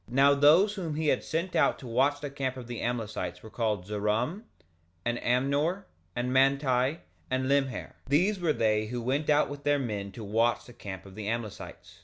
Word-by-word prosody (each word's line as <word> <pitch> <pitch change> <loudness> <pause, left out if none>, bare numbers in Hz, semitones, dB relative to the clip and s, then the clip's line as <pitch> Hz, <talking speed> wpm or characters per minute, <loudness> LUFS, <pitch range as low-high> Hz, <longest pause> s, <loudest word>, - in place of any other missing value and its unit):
2:22 120 - -7
Now 140 +1 +6
those 155 +9 +5
whom 170 -7 -4
he 155 -1 +1
had - - +1
sent 170 +3 -2
out - - +3
to - - -11
watch 135 +5 +1
the 145 -2 -5
camp 135 -2 -3
of 125 - -7
the 120 -1 -6
Amlicites 110 -7 -3
were 110 - -11
called 105 -6 -1
Zeram, 105 - -1 0.6
and 120 0 0
Amnor, 140 +9 +1 0.3
and 125 +1 -1
Manti, 135 +1 +2 0.3
and 130 0 0
Limher; 135 -2 0 0.2
these 180 +9 +2
were 170 -3 +2
they 110 -3 +1
who 120 +2 -3
went 135 +6 -1
out 150 0 +4
with 145 0 -8
their 145 0 +3
men 105 -7 -3
to 115 - -8
watch 115 +3 +1
the 120 - -13
camp 95 -4 -8
of 95 - -12
the 105 0 -6
Amlicites. 115 -2 -6
130 Hz, 200 wpm, -29 LUFS, 115-145 Hz, 0.6 s, Now